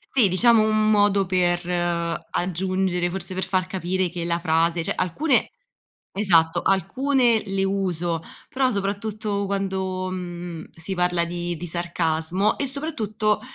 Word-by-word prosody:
Sì, 245 -6 +6
diciamo 225 +5 +5
un 215 0 +2
modo 205 -2 +3
per 175 -1 +1 0.6
aggiungere, 185 0 -1
forse 190 +1 -4
per 185 +1 -2
far 185 -1 0
capire 185 0 -1
che 170 0 -5
la 170 0 +1
frase 165 0 +1
cioè - - -1
alcune 255 - +1 0.6
esatto, 170 -5 +3
alcune 240 - +2
le 195 -1 -1
uso 180 -4 -1 0.3
però 260 -1 +1
soprattutto 205 0 -2
quando, 190 -1 -2
mhmm, 175 -2 -6
si 170 +4 -5
parla 180 -1 +2
di 175 0 -3
di 175 +2 -7
sarcasmo 170 +3 0
e 280 - -1
soprattutto 220 -7 0
185 Hz, 135 wpm, -23 LUFS, 175-205 Hz, 0.6 s, Sì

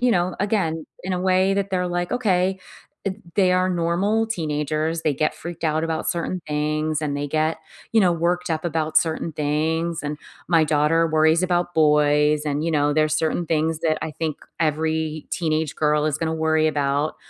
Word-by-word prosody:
you 245 0 +3
know, 175 0 0
again, 185 -6 -1 0.2
in 185 +1 -3
a 180 - -1
way 190 +1 +2
that 200 0 -1
they're 180 -1 0
like, 175 +2 -2
"Okay." 190 -6 +1 0.5
Th 190 0 -1 0.2
they 190 -3 +3
are 185 0 +2
normal 185 +6 +1
teenagers, 155 -4 -1
they 150 -3 +1
get 155 +3 0
freaked 170 -1 -7
out 155 0 +1
about 160 -1 0
certain 175 +1 -3
things 155 +1 -1
and 145 -1 -1
they 145 0 -2
get, 155 +2 0 0.4
you 225 - +4
know, 180 -3 +4
worked 175 +1 -1
up 160 -1 -1
about 160 -2 +2
certain 160 0 -2
things, 160 +3 -1
and 150 +1 -3 0.3
my 165 -2 +4
daughter 155 +2 +2
worries 160 +2 +3
about 175 -1 0
boys 150 -1 +3
and, 145 0 -1
you 165 - 0
know, 145 -1 +2
there's 155 0 +2
certain 160 +2 -1
things 160 0 0
that 155 -1 +1
I 160 - -3
think 155 -2 -3 0.2
every 155 0 -1
teenage 160 -4 -1
girl 150 0 +2
is 155 0 -1
gonna 160 -1 -1
worry 160 0 +2
about. 145 0 0
160 Hz, 185 wpm, -23 LUFS, 155-175 Hz, 0.5 s, you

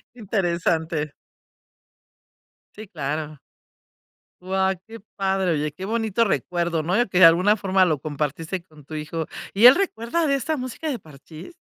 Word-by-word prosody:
Interesante. 170 - -1 1.6
Sí, 215 -1 -10
claro. 150 -3 -4 1.0
Guau, 190 +1 0
qué 230 0 -10 0.2
padre, 190 -2 +1
oye, 150 -1 -1
qué 190 +5 -8
bonito 225 0 0
recuerdo, 175 -4 -1
¿no?, 180 +8 0
y 240 - +2
que, 185 -1 0
de 185 - +10
alguna 180 +6 +5
forma, 190 -1 +2
lo 155 -5 0
compartiste 155 +4 -4
con 155 -5 -19
tu 155 - -8
hijo, 155 +1 -4 0.3
¿y 215 +5 +8
él 255 - +9
recuerda 335 - -1
de 280 - +2
esta 300 +3 -1
música 255 +5 -5
de 265 - -2
Parchís? 155 - -13
185 Hz, 150 wpm, -23 LUFS, 155-220 Hz, 1.6 s, de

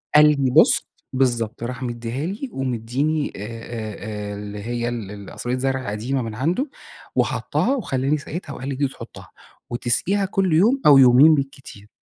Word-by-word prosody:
قال 150 - +9 0.2
لي 130 - +2
بُص - - +5 0.3
بالضبط، 120 -3 0
راح 125 +1 -4
مدّيها 120 +3 -4
لي 210 +9 -4
ومدّيني 135 +4 -1
آآ، - - -7
آآ، 110 -2 -6
آآ، - - -5
اللي 105 0 -7
هي 120 +1 -2
ال 115 -5 -5
ال 100 -1 -9
قصرية 125 +1 -3
زرع 130 -3 -1
قديمة 125 +6 -2
من 110 -2 -5
عنده 175 - 0 0.5
وحطها 275 - +1
وخلّاني 140 - 0
سقيتها 150 +1 -7
وقال 130 - -6
لي: 135 - -2
"دي 140 +1 +1
تحطها، - - -11 0.4
وتسقيها 125 +12 0
كل 190 -3 0
يوم 230 - +4
أو 145 -2 +9
يومين 135 +4 +7
بالكتير." 135 -7 -6
130 Hz, 165 wpm, -22 LUFS, 115-150 Hz, 0.5 s, قال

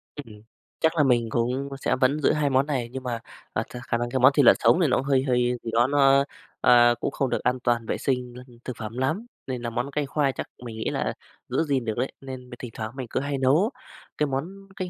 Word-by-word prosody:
Ừm, 110 -8 -10 0.4
chắc 160 +1 +2
là 150 - +5
mình 120 -4 +2
cũng 125 +4 -1
sẽ - - +1
vẫn 130 +4 +2
giữ - - +4
hai 150 -2 +1
món 135 +1 +3
này 130 -6 -2
nhưng 130 0 -6
mà, 120 -2 -3 0.3
à, - - 0
th - - -6
khả 120 - +1
năng 120 0 -2
thì 130 - -1
món 130 +3 +7
thịt 140 -3 +4
lợn - - +8
sống 175 - +4
thì 160 - +4
nó 125 - +2
cũng 135 - -2
hơi 135 -2 +2
hơi 125 -2 +1
gì 115 - -4
đó 120 +2 +4
nó, 140 -1 +4 0.4
ờ, 120 -1 +6
cũng - - -2
không 135 -2 -1
được 120 - -2
an 125 0 +1
toàn 120 -2 +1
vệ - - -2
sinh, 125 -2 -2
ơ, 125 - -9 0.2
thực 125 -3 -5
phẩm 110 +1 -6
lắm. 155 - -1 0.2
Nên 125 -2 -3
là 120 - -3
món 120 +4 -3
canh 145 -1 -1
khoai 140 -1 +1
chắc - - -6 0.2
mình 115 -2 -7
nghĩ 110 - -2
là - - -2 0.4
giữ - - +1
gìn 135 -6 0
được 110 - -1
đấy. 130 +3 -1
Nên 130 -2 -8
thỉnh 120 -3 -7
thoảng 110 -1 -5
mình 130 -3 -5
cứ - - -1
hay 140 +1 -2
nấu 150 - +3 0.5
cái 150 - +1
món 180 +9 -5
canh 185 -1 -4
130 Hz, 260 wpm, -25 LUFS, 120-140 Hz, 0.5 s, lợn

